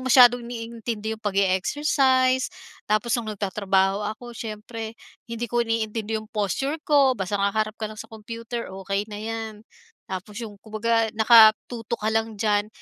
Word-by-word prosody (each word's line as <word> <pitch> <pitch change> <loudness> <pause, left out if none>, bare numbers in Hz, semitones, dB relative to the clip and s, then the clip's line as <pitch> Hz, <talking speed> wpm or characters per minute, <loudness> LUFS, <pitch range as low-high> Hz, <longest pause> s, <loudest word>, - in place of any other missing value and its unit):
masyadong 245 -1 +7
iniintindi 230 -2 -5
'yong 220 - -23
pag-e-exercise. 255 +7 +2 0.4
Tapos 215 +2 +1
no'ng 215 -2 -6
nagtatrabaho 195 0 +1 0.2
ako 240 +1 -10
siyempre, 225 0 -7 0.3
hindi 230 0 -3
ko 240 +1 0
iniintindi 225 -1 -1
'yong 215 0 -7
posture 270 - -1
ko, 280 -3 +5
basta 200 -3 -2
haharap 215 +2 0
ka 220 - -4
lang 215 0 -6
sa 225 - -9
computer, 230 0 -7
okey 195 +1 -1
na - - -5
'yan. 225 0 -4 0.5
Tapos 190 +2 -7
'yong, 215 -3 -7
kumbaga 225 +1 0
nakatutok 225 +1 +5
ka 220 - +2
lang 225 0 0
diyan. 205 -1 +1
220 Hz, 145 wpm, -24 LUFS, 210-235 Hz, 0.5 s, masyadong